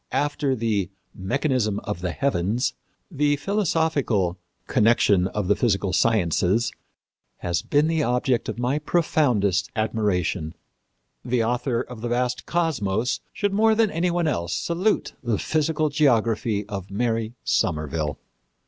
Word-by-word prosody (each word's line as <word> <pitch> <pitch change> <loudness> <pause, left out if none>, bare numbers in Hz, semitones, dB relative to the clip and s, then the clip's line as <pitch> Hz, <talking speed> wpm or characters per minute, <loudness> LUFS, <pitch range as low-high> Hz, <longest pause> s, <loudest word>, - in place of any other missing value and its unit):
After 145 -2 0
the 110 -6 -1 0.2
Mechanism 110 0 0
of 105 -4 -4
the 90 - -1
Heavens, 115 +1 0 0.4
the 145 -1 +2
philosophical 145 - 0 0.3
Connection 105 -4 +3
of 100 -1 -3
the 105 - +4
Physical 95 -5 0
Sciences 100 +1 +2 0.7
has 85 -1 -1
been 145 +1 +2
the 160 -1 +1
object 125 -1 0
of - - -4
my 125 +4 0
profound 150 - +1 0.3
admiration.... 100 -7 -1 0.7
The 120 -1 +1
author 120 +1 0
of 125 -3 -9
the 120 - -2
vast 125 +1 -1
Cosmos 125 - 0
should 205 -1 -1
more 220 +2 +4
than 220 -2 +2
any 170 +3 0
one 170 -1 0
else 85 - -1
salute 170 - 0
the 115 -4 0
Physical 155 +2 0
Geography 115 - +1
of 100 -3 -6
Mary 115 +2 -1
Somerville.... 75 0 -1
120 Hz, 130 wpm, -24 LUFS, 100-145 Hz, 0.7 s, the